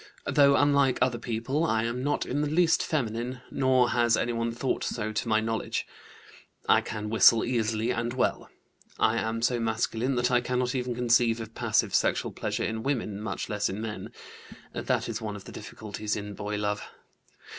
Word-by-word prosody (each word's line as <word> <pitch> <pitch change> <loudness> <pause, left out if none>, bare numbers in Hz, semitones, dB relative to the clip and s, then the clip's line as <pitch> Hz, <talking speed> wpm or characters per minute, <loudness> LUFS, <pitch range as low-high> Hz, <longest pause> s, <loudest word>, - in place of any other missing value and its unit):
Though 140 -1 +5
unlike 140 -2 +3
other 125 -2 +1
people, 120 +7 -2
I 115 -9 +1
am 120 +2 -2
not 145 - 0
in 145 - -1
the 150 - 0
least 165 +2 +3
feminine, 125 -3 -2
nor 130 -2 +3
has 120 -1 +3
anyone 115 -1 -1
thought 120 +3 -2
so 110 -2 -2
to 110 - -2
my 110 -1 +3
knowledge. 115 0 -2 0.8
I - - +5
can 105 -1 -5
whistle 110 +1 +6
easily 115 -2 0
and 115 +1 -1
well. 130 - -1 0.5
I 115 +1 +2
am 115 +1 -2
so 120 0 +2
masculine 115 +3 0
that 125 +1 +1
I 120 0 +4
cannot 125 0 -1
even 125 -2 -2
conceive 120 -1 +3
of 110 0 -7
passive - - +1
sexual - - +1
pleasure - - -3
in 110 0 -2
women, 110 -6 -2
much 105 -3 -4
less 105 -1 -1
in 95 - -4
men. 110 -1 -5 0.6
(That - - -1
is - - -4
one 105 -2 -4
of 100 - -9
the - - -11
difficulties 105 0 -5
in 105 -1 -5
boy 105 +1 -4
love.) 105 0 -1
115 Hz, 180 wpm, -28 LUFS, 110-125 Hz, 0.8 s, whistle